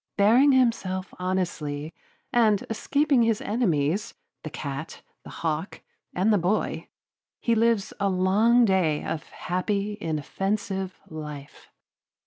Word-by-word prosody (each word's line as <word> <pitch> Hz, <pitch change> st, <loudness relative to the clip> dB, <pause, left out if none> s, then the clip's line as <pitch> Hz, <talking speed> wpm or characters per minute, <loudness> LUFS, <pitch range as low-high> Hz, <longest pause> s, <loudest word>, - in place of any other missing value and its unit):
Bearing 235 Hz, +8 st, +6 dB
himself 205 Hz, -7 st, +1 dB
honestly, 165 Hz, -5 st, -2 dB, 0.4 s
and 220 Hz, -4 st, +3 dB
escaping 280 Hz, +3 st, +2 dB
his 225 Hz, -2 st, +2 dB
enemies, 190 Hz, -, 0 dB, 0.3 s
the 155 Hz, -, -6 dB
cat, 140 Hz, 0 st, -6 dB, 0.2 s
the -, -, -11 dB
hawk, 160 Hz, +3 st, -3 dB, 0.3 s
and 200 Hz, +5 st, +3 dB
the 205 Hz, -, +3 dB
boy, 185 Hz, +5 st, -1 dB, 0.5 s
he 235 Hz, -, +1 dB
lives 230 Hz, -2 st, +2 dB
a 200 Hz, -1 st, +2 dB
long 205 Hz, +6 st, +4 dB
day 180 Hz, -7 st, +2 dB
of 160 Hz, -, -3 dB
happy 200 Hz, +3 st, -2 dB
inoffensive 190 Hz, +5 st, -2 dB
life. 150 Hz, -2 st, -9 dB
190 Hz, 115 wpm, -26 LUFS, 160-220 Hz, 0.5 s, Bearing